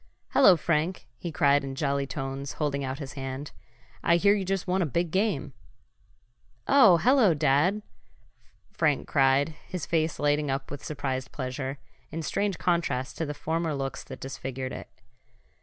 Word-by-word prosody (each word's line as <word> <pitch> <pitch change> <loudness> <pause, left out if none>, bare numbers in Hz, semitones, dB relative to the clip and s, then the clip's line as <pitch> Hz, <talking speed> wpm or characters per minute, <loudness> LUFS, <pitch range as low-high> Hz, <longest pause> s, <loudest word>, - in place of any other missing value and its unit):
"Hello, 195 -10 +6
Frank!" 165 +3 -1
he 170 - -5
cried 140 -1 +3
in 135 -1 -5
jolly 140 -1 0
tones, 135 0 -5
holding 140 -2 -1
out 130 0 -3
his 140 -3 -7
hand. 135 +1 -5 0.5
"I 170 - +4
hear 200 +4 +4
you 205 -2 0
just 190 0 -2
won 185 +1 +1
a - - +2
big 170 +4 -1
game." 190 -8 0 1.1
"Oh, 225 -11 +7
hello, 230 - +4
Dad!" 150 +8 +2 0.9
Frank 150 -4 +1
cried, 135 +1 +3 0.2
his 180 -4 -4
face 160 -1 0
lighting 145 0 +1
up 135 0 -3
with 145 - -7
surprised 135 -3 -3
pleasure, 130 +1 -4 0.3
in 165 +1 -5
strange 200 +3 -1
contrast 170 -8 0
to 160 - -1
the 150 - -4
former 160 0 -2
looks 135 -1 -4
that - - -9
disfigured 130 -1 -5
it. - - -8
150 Hz, 155 wpm, -27 LUFS, 135-175 Hz, 1.1 s, Oh